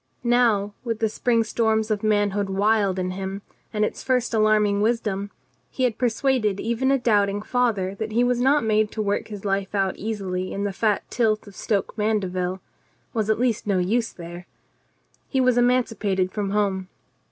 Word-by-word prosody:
Now, 235 -4 +2
with 230 -3 -2
the 220 - +1
spring 230 +1 +1
storms 220 -1 0
of 210 -1 0
manhood 205 -2 +1
wild 200 0 +2
in 185 0 -1
him, 195 +1 -5 0.3
and 210 -1 +1
its - - -5
first 250 -2 0
alarm 215 -1 +4
ing 200 0 0
wisdom, 210 -3 0 0.4
he 260 - -3
had 240 -4 0
persuaded 240 -4 +1
even 235 +3 0
a 275 - +4
doubting 205 -4 +1
father 215 -7 0
that 220 0 -3
he 235 +3 +2
was 245 0 +1
not 275 +1 +3
made 215 -1 +2
to 220 - -2
work 205 0 -1
his 205 -2 -8
life 195 0 -1
out 195 -1 +1
easily 190 -4 -3
in 200 - -3
the 200 -1 -2
fat 210 +1 +1
tilth 220 -3 +1
of 200 -2 -13
Stoke 200 -1 -1
Mandeville 185 -4 -1 0.3
— - - -40
was 220 -3 -1
at 220 - +2
least 240 -4 0
no 200 -2 +2
use 220 +6 0
there. 175 +1 -10 0.8
He 265 - 0
was 255 -1 +3
emancipated 225 -6 +1
from 205 -2 -2
home. 195 -2 0
215 Hz, 185 wpm, -24 LUFS, 195-230 Hz, 0.8 s, alarm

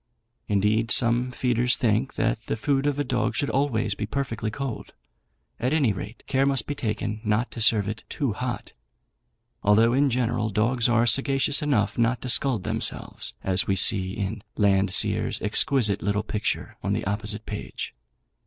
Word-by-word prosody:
Indeed, 105 +3 +1
some 120 +1 +3
feeders 125 -1 +1
think 120 +1 0
that 115 0 0
the - - -1
food 135 +5 0
of 145 -1 0
a 145 - 0
dog 125 -2 -1
should 140 - -1
always 120 -6 0
be 105 +1 -5
perfectly 115 -4 -3
cold. 130 +2 -6 0.7
At 125 +4 0
any 140 -9 +2
rate, 105 +4 -8
care 135 0 +1
must 135 -5 0
be 145 - -3
taken 110 -4 -3
not 105 +2 0
to 115 - -6
serve 105 -2 +4
it 110 +2 -4
out - - -45
"too 135 -7 -2
hot," 120 +3 -5 0.9
although, 110 +3 +4
in 140 +2 +3
general, 120 -3 -1
dogs 115 +4 +1
are 120 0 +3
sagacious 135 +3 +2
enough 115 -9 0
not 120 +2 +1
to 125 - -4
scald 120 -5 +3
themselves, - - -3
as 95 0 +1
we 95 - +1
see 95 0 +3
in 105 +1 -4 0.2
Landseer's 100 -2 +2
exquisite 105 -1 +2
little 100 +1 -1
picture 105 -1 -3
on - - -1
the - - -2
opposite 105 +2 -2
page. 105 - -6
115 Hz, 170 wpm, -25 LUFS, 105-130 Hz, 0.9 s, serve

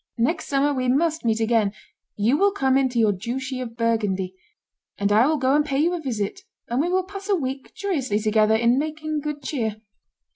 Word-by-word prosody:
Next 295 +9 0
summer 285 +1 +2
we 255 -2 -1
must 315 +5 +1
meet 225 -1 +2
again; 225 -3 +2 0.4
you 220 +6 +2
will 400 +5 +3
come 265 -8 +2
into 260 -2 +1
your 220 -2 +4
duchy 255 +6 -4
of 230 -2 -7
Burgundy, 205 -5 0 0.6
and 200 0 0
I 220 +5 +5
will 310 0 +2
go 265 -1 +2
and 295 +1 +4
pay 275 -2 -2
you 330 +5 +2
a 350 - -2
visit, 220 -8 -3 0.3
and 240 +3 +1
we 340 - 0
will 370 +1 +1
pass 395 +2 -9
a 400 - +4
week 270 -4 -5
joyously 285 - -1
together 215 0 +3
in 235 +3 +3
making 310 0 -3
good 295 0 -5
cheer." 225 -8 -2
260 Hz, 205 wpm, -23 LUFS, 225-305 Hz, 0.6 s, I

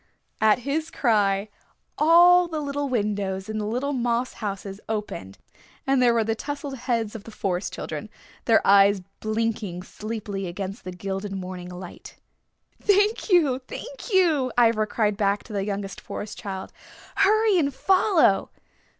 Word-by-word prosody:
At 220 +2 +5
his 310 +3 -1
cry 205 -4 +1 0.5
all 350 +3 +6
the 320 -2 -3
little 285 -1 -2
windows 205 -4 -1
in 215 0 -3
the 210 - -2
little 255 +6 -1
moss 245 -1 0
houses 200 -1 -5
opened 210 - -4 0.5
and 270 -1 +2
there 240 -1 +4
were 230 - +3
the 225 +1 0
tousled 285 +3 -5
heads 235 -4 -2
of 225 -3 -8
the - - -11
Forest 195 -4 -2
Children, - - -6 0.4
their 225 -2 +4
eyes 200 0 +5 0.2
blinking 215 -4 -2
sleepily 210 -2 -5
against 190 +3 -6
the 185 - -5
gilded 195 +2 -5
morning 180 -1 -6
light. 180 0 -10 0.7
"Thank 410 +3 +2
you, 305 -9 +4
thank - - -8
you," 320 -9 +3
Ivra 225 -2 +4
cried 210 -1 0
back 200 -1 +1
to 220 - -11
the 195 -1 -1
youngest 200 -1 -4
Forest 210 0 -6
Child. 190 -2 -6 0.4
"Hurry 420 0 +4
and 285 -3 +1
follow." 365 - +3
220 Hz, 150 wpm, -25 LUFS, 200-280 Hz, 0.7 s, all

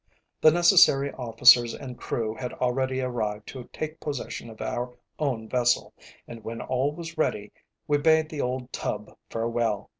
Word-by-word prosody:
The 155 - +8
necessary 165 -5 +5
officers 120 -1 +5
and 130 -3 -8
crew 110 -2 -3
had 125 +2 -6
already 130 +1 -1
arrived 110 -4 -3
to 125 -3 -9
take 155 0 -5
possession 140 -5 -5
of 110 - -13
our 125 0 -4 0.2
own 125 -7 -2
vessel, 120 0 +1 0.3
and 115 -2 -10
when 115 +1 -6
all 130 +3 0
was 160 0 -8
ready, 105 -9 -1 0.4
we 145 -1 +2
bade 160 +1 +3
the 155 -3 -4
old 125 0 -3
tub 105 0 -4
farewell. 115 -2 -1
125 Hz, 155 wpm, -26 LUFS, 115-145 Hz, 0.4 s, The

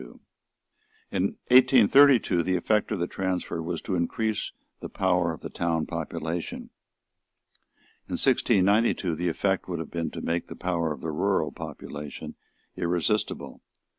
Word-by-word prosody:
In - - -1 0.2
1832 130 -4 +6
the 95 +2 0
effect 105 +5 +1
of 105 - 0
the 85 - 0
transfer 90 -2 -3
was 85 0 -4
to 100 - -3
increase 105 +5 -1 0.3
the - - -7
power 90 -3 +1
of 80 - -8
the - - -6
town 80 -2 -1
population. 80 +2 -5 1.4
In - - -6
1692 100 -2 +3
the 85 +3 -1
effect 95 +3 -1
would 90 - -2
have 80 -1 -6
been 85 -1 -2
to - - -7
make 85 +1 -2
the - - -8
power 85 -3 -1
of 75 - -6
the 80 - -3
rural 75 - 0
population 75 -1 -8 0.4
irresistible. 90 +5 -1
90 Hz, 135 wpm, -26 LUFS, 85-100 Hz, 1.4 s, 1832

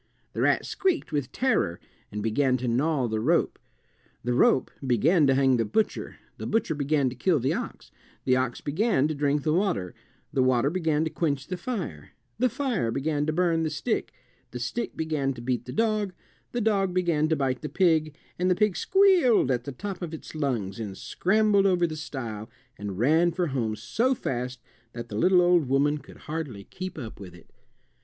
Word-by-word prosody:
The - - -2
rat - - +2
squeaked 370 - -1
with 145 -4 -2
terror 255 - 0 0.3
and 105 0 -4
began 130 +4 +2
to 125 0 -4
gnaw 130 +2 +1
the 110 -1 -1
rope. 160 +10 +1 0.6
The 120 +2 0
rope 130 +1 +3 0.2
began 145 - +4
to 135 - +4
hang 135 -2 +4
the 115 - +2
butcher, 215 - -1 0.2
the - - -4
butcher 220 -7 +1
began 145 -1 +1
to - - -8
kill 165 +6 +2
the 130 +2 0
ox, - - -6 0.3
the 130 - +4
ox 130 -2 -1
began 155 - +1
to - - -1
drink 145 0 0
the 155 - +1
water, 175 - 0 0.4
the 135 - +2
water 130 +2 +3
began 160 -4 +1
to 160 - -2
quench 145 -4 -1
the 185 - -4
fire, 175 - -5 0.3
the 255 +1 +3
fire 240 - -1
began 145 +4 -1
to - - +2
burn 165 0 +1
the 160 - 0
stick, 150 -1 -2 0.4
the 125 - -7
stick 130 - -3
began 150 -4 -1
to 120 - -9
beat 120 0 -2
the 125 - -7
dog, 215 - 0 0.4
the 240 - -2
dog 195 -4 +1
began 165 -4 +2
to 160 - +3
bite 130 -4 -1
the 150 - -4
pig, 160 -5 +2 0.2
and 180 +1 +2
the 180 - +4
pig 210 -1 +2
squealed 360 - +4
at 125 - -1
the 140 - -4
top 190 +7 -6
of 165 -2 -4
its - - -11
lungs 120 -10 -2
and 100 -4 -5
scrambled 205 0 +2
over 180 -2 +3
the 160 -2 -4
stile 115 -8 -6 0.3
and 100 -4 -6
ran 160 - +3
for 175 +1 -1
home 115 -5 -1
so 225 - 0
fast 125 - -4 0.3
that 120 0 -7
the 105 - -6
little 180 - +4
old 175 -4 +4
woman 145 +2 +2
could - - -15
hardly 150 -10 -5
keep 185 - -7
up 120 -7 -7
with 90 -3 -10
it. 85 - -18
150 Hz, 195 wpm, -26 LUFS, 125-180 Hz, 0.6 s, began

